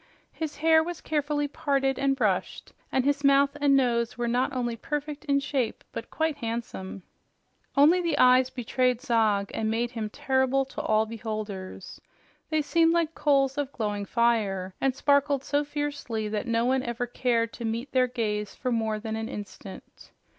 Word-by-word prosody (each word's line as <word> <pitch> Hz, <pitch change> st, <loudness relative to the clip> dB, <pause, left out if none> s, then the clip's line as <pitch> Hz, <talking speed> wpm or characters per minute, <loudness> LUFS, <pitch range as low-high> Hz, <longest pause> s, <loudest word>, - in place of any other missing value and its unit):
His 315 Hz, -2 st, -5 dB
hair 320 Hz, +1 st, +5 dB
was 345 Hz, 0 st, -5 dB
carefully 290 Hz, -1 st, -1 dB
parted 275 Hz, -2 st, 0 dB
and 275 Hz, 0 st, +2 dB
brushed, 210 Hz, -8 st, -1 dB, 0.2 s
and 260 Hz, -1 st, +1 dB
his 285 Hz, 0 st, +1 dB
mouth 280 Hz, 0 st, +4 dB
and 280 Hz, -1 st, +5 dB
nose 235 Hz, -3 st, +1 dB
were 240 Hz, 0 st, -1 dB
not 245 Hz, +2 st, +1 dB
only 240 Hz, -2 st, -2 dB
perfect 295 Hz, +4 st, -4 dB
in 280 Hz, -2 st, +2 dB
shape 275 Hz, -4 st, -2 dB
but -, -, -7 dB
quite 320 Hz, -2 st, -1 dB
handsome. 225 Hz, -6 st, -5 dB, 0.7 s
Only 320 Hz, +6 st, +6 dB
the 335 Hz, -4 st, 0 dB
eyes 255 Hz, -1 st, +5 dB
betrayed 250 Hz, 0 st, 0 dB
Zog 220 Hz, -6 st, +1 dB
and 220 Hz, 0 st, -1 dB
made 235 Hz, +2 st, -1 dB
him 225 Hz, -3 st, -4 dB
terrible 265 Hz, +3 st, +1 dB
to 265 Hz, -, -6 dB
all 215 Hz, 0 st, +2 dB
beholders. 215 Hz, -4 st, -6 dB, 0.5 s
They 310 Hz, -1 st, +1 dB
seemed 330 Hz, +2 st, +3 dB
like 335 Hz, -1 st, +1 dB
coals 275 Hz, -2 st, +2 dB
of 280 Hz, -2 st, -2 dB
glowing 210 Hz, -4 st, -3 dB
fire 200 Hz, -5 st, +1 dB
and 270 Hz, -1 st, +1 dB
sparkled 280 Hz, -1 st, +2 dB
so 290 Hz, +1 st, 0 dB
fiercely 285 Hz, -7 st, -3 dB
that 215 Hz, +2 st, -3 dB
no 230 Hz, 0 st, +1 dB
one 260 Hz, +1 st, +2 dB
ever 240 Hz, -1 st, -3 dB
cared 235 Hz, -2 st, 0 dB
to -, -, -8 dB
meet 230 Hz, +4 st, -3 dB
their 255 Hz, -1 st, +3 dB
gaze 210 Hz, -4 st, -3 dB
for 255 Hz, -, -3 dB
more 220 Hz, -2 st, 0 dB
than 220 Hz, 0 st, -4 dB
an 220 Hz, 0 st, -4 dB
instant. 195 Hz, -1 st, -10 dB
255 Hz, 170 wpm, -27 LUFS, 225-285 Hz, 0.7 s, Only